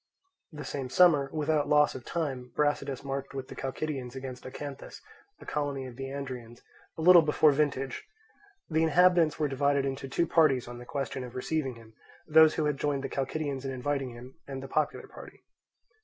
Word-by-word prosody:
The 150 -3 -8
same 135 -2 -4
summer, 150 -3 +5
without 155 -1 0
loss 150 0 +4
of 130 - -8
time, 135 -7 -3
Brasidas 145 -2 0
marched 135 0 -5
with 130 -1 -5
the - - -8
Chalcidians 135 -2 -4
against 130 -1 -7
Acanthus, 140 +1 -8 0.4
a - - -13
colony 145 -3 -2
of 125 -2 -9
the 135 +2 -5
Andrians, 130 -4 -7 0.3
a 160 - -3
little 180 0 +9
before 155 0 +4
vintage. 140 -2 -1 0.6
The 160 -1 +1
inhabitants 165 0 +4
were 150 - +1
divided 140 0 +1
into 135 0 -4
two 170 - +1
parties 145 -7 +3
on 120 0 -8
the 125 - -10
question 135 -1 -4
of 125 -1 -9
receiving 135 0 -2
him; 115 -1 -16 0.3
those 160 0 +6
who 155 - 0
had 150 -2 0
joined 140 -2 -1
the 135 - -3
Chalcidians 140 0 -3
in 135 - -3
inviting 135 +1 -2
him, 120 +2 -12
and 135 -1 -6
the - - -6
popular 150 +2 -1
party. - - -13
140 Hz, 185 wpm, -29 LUFS, 130-150 Hz, 0.6 s, little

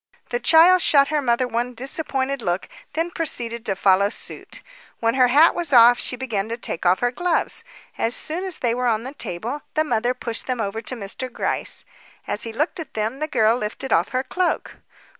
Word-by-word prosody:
The 485 - -1
child 350 -1 +6
shot 280 -3 +4
her 300 -1 +1
mother 250 -1 +1
one 245 +1 -2
disappointed 270 +1 -2
look, 175 -2 -2 0.3
then 330 +3 -1
proceeded 235 -9 -1
to 195 - 0
follow 195 +1 +3
suit. - - -7 0.4
When 230 0 +1
her 255 -1 +4
hat 295 +7 +5
was 340 -4 -3
off, 240 -1 +7
she - - -1
began 225 -5 -3
to 230 - -3
take 180 -7 -3
off 180 +1 +3
her 245 0 +2
gloves. 350 +5 -1 0.4
As 230 +2 0
soon 335 +4 -2
as 375 -3 -2
they 235 -2 0
were 250 +1 -1
on 225 -1 +1
the 265 +2 -7
table, 240 +4 -5
the 310 - +3
mother 245 -3 0
pushed 230 -2 -5
them 255 -2 -2
over 220 +1 -3
to 255 - -4
Mr. 230 +4 -6
Gryce. - - -2 0.4
As - - -2
he 230 - -2
looked 305 - -1
at 325 - -8
them, 220 +5 -2
the 310 - -2
girl 225 -5 +3
lifted 245 +3 -3
off 165 +2 +2
her 255 +1 -1
cloak. 360 +5 -2
245 Hz, 205 wpm, -22 LUFS, 225-295 Hz, 0.4 s, off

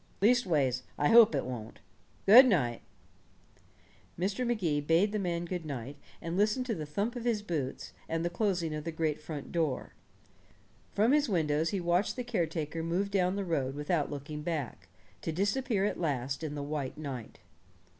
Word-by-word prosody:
Leastways, 170 - +3 0.2
I 145 - +2
hope 230 -1 +8
it - - -1
won't. 120 -4 -6 0.5
Good 245 +7 +10
night." 125 - +1 1.4
Mr. 195 +7 -1
Magee 175 -11 0
bade 165 +7 +3
the 215 - -1
man 175 -3 -2
good 175 -1 -4
night, 140 -2 -6 0.3
and 165 +1 -3
listened 215 +6 +2
to 240 - -1
the 155 -7 -5
thump 200 +11 -2
of 240 - -5
his 230 -4 0
boots, 150 -9 -4 0.2
and 165 +1 -1
the - - +1
closing 175 -4 0
of 150 -1 -4
the 165 - -3
great 155 -2 -1
front 150 -2 -7
door. 160 -6 -1 1.0
From 220 +5 +3
his 295 -2 +3
windows 160 -4 +1
he 200 - -1
watched 175 +3 +1
the 250 - -3
caretaker 165 -8 -2
move 180 +5 -1
down 185 -1 +2
the 200 -1 -2
road 140 -6 -1
without 150 +1 0
looking 150 +1 -6
back, 145 - -4 0.3
to 165 - -2
disappear 200 +4 0
at 210 - -2
last 140 -3 -2
in 150 -2 -4
the 145 - -4
white 145 -2 -4
night. 135 -7 -6
165 Hz, 175 wpm, -31 LUFS, 150-200 Hz, 1.4 s, Good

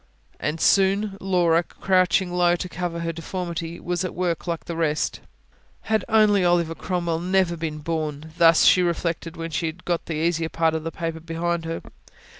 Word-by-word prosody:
And 150 +2 -2
soon 195 +2 +3
Laura, 175 -3 +3
crouching 185 0 +1
low 175 -1 +3
to 180 - -4
cover 175 -1 -4
her 165 0 -2
deformity, 170 0 -5
was 175 0 -2
at 185 - -4
work 180 -1 -2
like 170 -1 -3
the 170 - -5
rest. 155 -2 0 0.6
Had 220 -3 0
only 210 -3 +4
Oliver 175 -2 +2
Cromwell 170 -1 -2
never 185 0 +1
been 160 -2 -4
born! 155 -1 -4
thus 165 -1 +6
she 185 - +6
reflected, 170 -1 -2
when 165 0 -5
she 165 +2 -1
had 160 +3 -7
got 175 -2 -1
the 165 - -3
easier 165 +1 0
part 165 -1 +1
of 160 -1 -2
the 165 - -4
paper 165 -1 -4
behind 165 +1 -2
her. 165 0 -4
170 Hz, 180 wpm, -24 LUFS, 165-180 Hz, 0.6 s, thus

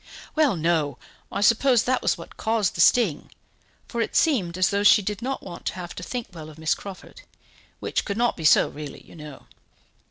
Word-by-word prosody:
"Well, 305 -8 +2
no; 160 -5 0 0.3
I - - -3
suppose 235 +3 +4
that 255 0 0
was - - +1
what - - -12
caused 220 -4 0
the 165 - 0
sting; 190 -7 +3 0.6
for 235 - -3
it - - -3
seemed 190 - +2
as 185 +1 +2
though 200 0 +1
she 205 0 +6
did 210 +2 -4
not 265 +2 -3
want 180 -2 -9
to - - -1
have 175 -2 -7
to - - -8
think 240 +4 -5
well 155 -2 -9
of 155 - -14
Miss 160 0 +1
Crawford, 195 -2 -10 0.6
which - - -2
could 200 - -4
not 240 +1 +1
be 165 - -8
so 155 - +5
really, 150 -1 -9
you - - -16
know. 150 -3 -11
195 Hz, 210 wpm, -24 LUFS, 165-230 Hz, 0.6 s, she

